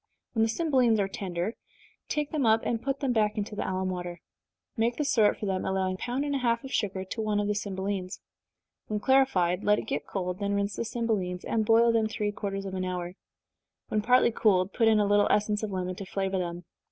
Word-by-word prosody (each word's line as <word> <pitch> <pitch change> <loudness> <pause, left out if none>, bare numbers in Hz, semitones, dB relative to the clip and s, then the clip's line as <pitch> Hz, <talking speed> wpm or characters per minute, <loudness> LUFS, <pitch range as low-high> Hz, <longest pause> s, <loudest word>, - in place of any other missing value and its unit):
When 225 - +1
the 225 - +3
cymbelines 255 -5 +2
are 195 - +1
tender, 190 +1 -3 0.6
take 300 -1 -1
them 305 -3 0
up, 225 -1 +4
and 230 -1 -1
put 275 +1 -2
them 265 -3 +1
back 215 -1 +1
into 210 0 -3
the - - -3
alum 185 0 -1
water. 175 -1 -5 0.6
Make 235 0 0
the 295 - 0
syrup 220 -7 +3
for - - -5
them, 190 -2 -1
allowing 190 -1 0
a - - -6
pound 255 +4 -2
and 285 - -1
a 275 - 0
half 235 -1 +1
of 270 - -7
sugar 195 -3 -1
to 205 +4 -4
one 210 -1 0
of 205 - 0
the 210 - +1
cymbelines. 195 -2 -3 0.7
When 210 -1 -2
clarified, 205 -9 +3
let 210 0 +4
it - - -3
get 145 +1 -3
cold 180 -2 -3
then 200 0 0
rinse 200 -1 -1
the - - -3
cymbelines, 215 -7 -2
and 220 -2 0
boil 230 +1 +5
them 225 -1 +2
three 210 -1 -2
quarters 195 -1 -4
of 190 - -5
an 185 0 -2
hour. 180 -1 -3 0.8
When 215 - +1
partly 245 +2 +4
cooled, 195 -4 +2
put 225 - +3
in 220 -1 +5
a 205 - +3
little 205 0 +4
essence 210 0 +1
of 215 - -3
lemon 185 -1 -3
to 195 - -6
flavor 195 -1 -1
them. 175 -1 -4
210 Hz, 230 wpm, -28 LUFS, 190-230 Hz, 0.8 s, boil